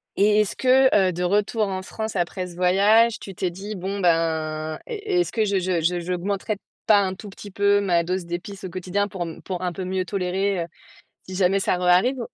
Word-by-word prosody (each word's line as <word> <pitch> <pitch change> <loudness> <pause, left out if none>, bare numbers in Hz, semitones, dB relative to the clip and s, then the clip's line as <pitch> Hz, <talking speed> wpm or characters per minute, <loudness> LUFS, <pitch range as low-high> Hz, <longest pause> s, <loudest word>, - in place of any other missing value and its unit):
et 210 +1 +4
est-ce 210 - -2
que, 260 +1 +4
heu, 190 -3 +4
de 180 +1 -3
retour 205 +3 +1
en 190 -1 -3
France, 220 +2 -5
après 180 +1 -2
ce 175 - -12
voyage, 205 +6 +4
tu 195 - -9
t'es 180 0 -2
dit: 195 +5 -7
«Bon, 195 +2 -4
ben, 160 -3 0
est 420 -6 -1
est-ce - - -2
que 220 - +1
je 200 -2 +1
je 180 -2 0
je 175 +2 +1
j'augmenterais 190 +4 -2 0.3
pas 210 -2 +6
un 190 -1 -1
tout 205 +2 -10
petit 205 +1 -11
peu 200 +1 +2
ma 175 -4 +2
dose 180 +1 -2
d'épices 190 +4 -6
au 185 - -5
quotidien, 185 +3 -2
pour 185 -4 -4 0.2
pour 185 -1 -4
un 180 - -1
peu 190 - -5
mieux 185 0 -2
tolérer, 190 +1 -1
heu, - - -14 0.6
si 185 - -6
jamais 190 +1 +2
ça 190 - +1
re-arrive»? 180 +9 +3
190 Hz, 215 wpm, -23 LUFS, 180-205 Hz, 0.6 s, pas